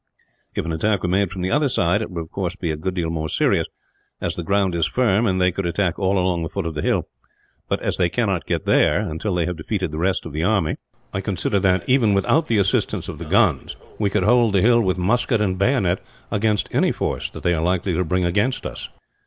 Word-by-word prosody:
If - - -2
an 80 - -2
attack 100 +4 0
were 90 - 0
made 95 +1 +2
from 90 -1 -5
the 95 - -1
other 145 -1 +2
side, 100 -3 +1
it 110 - -4
would 85 -3 -4
of 80 - -10
course 95 -2 -3
be 85 -4 -3
a - - -2
good 90 +5 -4
deal 85 -3 -1
more 80 -1 -3
serious, - - +1 0.5
as - - -2
the - - -4
ground 95 +2 +1
is 85 -2 +1
firm 115 -3 +2
and 95 -1 +1
they 90 0 +3
could 95 0 -3
attack 85 0 -1
all 95 0 +1
along 90 -2 +1
the 80 - -3
foot 100 -3 -4
of 80 - -3
the 75 - -3
hill; - - 0 0.6
but - - 0
as - - -1
they 90 - +2
cannot 100 -3 -1
get - - -1
there, - - +3
until 95 +1 -3
they 85 -2 +1
have 90 -2 -3
defeated 90 +1 -3
the 75 - -4
rest 95 +2 0
of 80 - -7
the 80 +2 -2
army, 95 -5 +1 0.4
I 95 - -2
consider 100 0 -1
that, 95 -2 +1
even 120 -6 +3
without 150 +11 +2
the 115 - +1
assistance 95 -1 0
of 75 - -7
the 85 - -6
guns, 90 - +2 0.2
we 105 -2 +1
could 100 -1 0
hold 115 0 +4
the 95 - +4
hill 120 +1 +5
with 95 -4 0
musket 115 +5 +1
and 95 -3 0
bayonet 100 -5 +1 0.3
against 105 0 +1
any - - +3
force - - -2
that - - -10
they 90 - +2
are 80 - 0
likely 90 +2 0
to 90 +3 +1
bring 90 +2 0
against 105 +9 0
us." - - -6
95 Hz, 250 wpm, -22 LUFS, 85-105 Hz, 0.6 s, hill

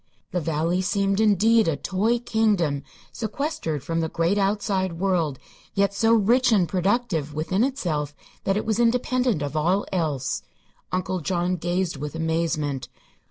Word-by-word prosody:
The 180 - -1
valley 165 +3 0
seemed, 195 +1 +1
indeed, 220 +1 +4
a 160 - +2
toy 210 +5 +1
kingdom 210 - +1 0.3
sequestered 220 - -3
from 165 0 -1
the 160 -1 -1
great 170 +6 +1
outside 195 -2 0
world, 165 -5 0 0.4
yet 200 0 +2
so 225 +2 +3
rich 240 +4 +3
and 195 -6 +4
productive 185 - 0
within 185 +7 0
itself 155 - -2 0.3
that 195 +1 +1
it - - -2
was 220 0 0
independent 245 - +2
of 145 +1 -4
all 180 +6 +1
else. 155 -8 -1 0.5
Uncle 185 0 -1
John 175 +2 0
gazed 175 -1 -1
with 150 +2 -5
amazement. 160 -4 -1
185 Hz, 145 wpm, -24 LUFS, 160-215 Hz, 0.5 s, indeed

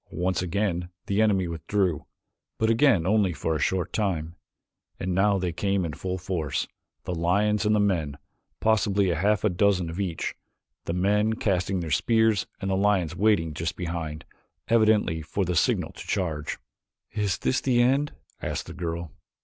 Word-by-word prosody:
Once 90 +1 -1
again 90 -1 -1 0.2
the 100 +2 +1
enemy 100 -4 +2
withdrew, 85 0 -1 0.5
but 110 0 +2
again 115 - +4
only 100 -2 +2
for 80 0 -1
a - - -1
short 90 +2 0
time, 85 -6 -1 0.6
and 90 0 -2
now 100 +2 +3
they 90 -2 -1
came 100 +1 0
in 80 - -4
full 95 +5 -3
force, 90 -5 -2 0.4
the 90 - -3
lions 100 +6 +1
and 105 - +4
the - - +3
men, 85 -9 0 0.4
possibly 100 -3 +2
a - - 0
half 100 +5 +1
dozen 95 -5 +2
of 85 - -6
each, 90 -5 -2 0.5
the 85 - -2
men 105 +4 +2
casting 95 -3 0
their 80 -2 -5
spears 110 - +2
and 95 - -2
the - - +2
lions 95 -4 +1
waiting 95 -5 +2
just 80 +2 -3
behind, 80 -3 -4 0.4
evidently 110 -7 +3
for 95 +5 -2
the 90 0 -1
signal - - +1
to - - -11
charge. 80 -6 -2 0.5
"Is 105 -4 -1
this 130 - 0
the 125 -3 +2
end?" 135 +4 +3 0.3
asked - - -3
the - - -8
girl. 85 -2 -4
95 Hz, 165 wpm, -26 LUFS, 85-105 Hz, 0.6 s, again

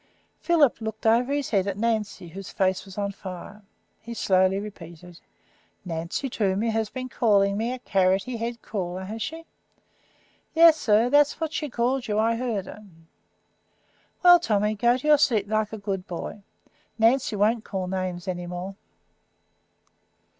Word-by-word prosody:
Philip 310 -9 +3
looked 220 0 -6
over 235 +4 +3
his 285 -2 -2
head 195 -3 +1
at 200 -1 -2
Nancy, 215 -5 -2
whose 190 +3 -9
face 190 0 0
was 195 0 -12
on 200 -1 -1
fire. 195 +2 -9 0.4
He 235 +1 -8
slowly 190 -2 +2
repeated: 175 -4 -9 0.7
"Nancy 170 +9 -3
Toomey 215 -1 0
has 220 -1 -1
been 255 -1 -5
calling 200 -5 +2
me 225 +4 -1
a 255 - -4
carroty 195 +2 +1
headed 230 0 -5
crawler, 185 -3 -4
has 215 +4 -6
she?" 325 +5 -5 1.1
"Yes, 330 -1 +8
sir. 230 -4 +2
That's 290 +1 +4
what 320 -1 -3
she 300 -2 -3
called 245 +2 -1
you. 210 -1 -1
I 225 +1 +2
heard 230 -5 -2
her." 210 - -11 1.4
"Well, 355 -1 +8
Tommy, 210 -7 +1
go 235 +4 +2
to 260 - -5
your 300 -1 +6
seat 220 -8 +2
like 215 0 0
a 220 - -5
good 195 -3 -4
boy. 180 +4 -6 0.6
Nancy 230 0 +2
won't 215 +3 +2
call 190 -4 -4
names 185 -1 -4
any 175 -1 -4
more." 180 +2 -5
215 Hz, 155 wpm, -25 LUFS, 190-240 Hz, 1.4 s, Yes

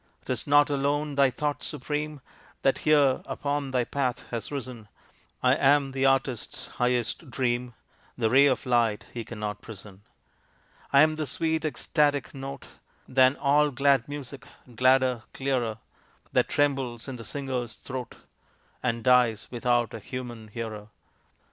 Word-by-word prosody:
"'Tis - - -3
not 145 0 +6
alone 145 +1 0
thy 140 -1 +4
thought 145 +3 -2
supreme 150 +1 -4 0.4
That 135 - +3
here 145 -4 +4
upon 145 -1 -2
thy 130 -2 +1
path 125 -1 -2
has 115 +1 -4
risen; 125 -6 -6 0.6
I 125 0 +5
am 140 0 +3
the 135 0 +2
artist's 135 -3 -1
highest 125 +4 0
dream, 120 -1 -1 0.4
The 115 -2 +2
ray 140 +3 +7
of 135 +1 0
light 120 -4 +1
he 120 - -4
cannot 105 -2 -5
prison. 100 -2 -12 0.9
I 140 +1 +7
am 155 0 +2
the 155 -2 -2
sweet 160 +4 -1
ecstatic 145 0 0
note 135 0 -7 0.4
Than 130 +1 +4
all 150 +1 +3
glad 140 -1 +2
music 140 -2 -7 0.3
gladder, 130 0 +3
clearer, 125 -5 -1 0.6
That - - +2
trembles 135 -5 0
in 130 -2 -5
the 115 - -9
singer's 130 -1 -4
throat, 130 -3 -7 0.7
And 115 -2 -1
dies 125 -4 +3
without 120 -1 +1
a 115 - -5
human 120 -1 -7
hearer. 110 -1 -6
130 Hz, 140 wpm, -27 LUFS, 120-140 Hz, 0.9 s, ray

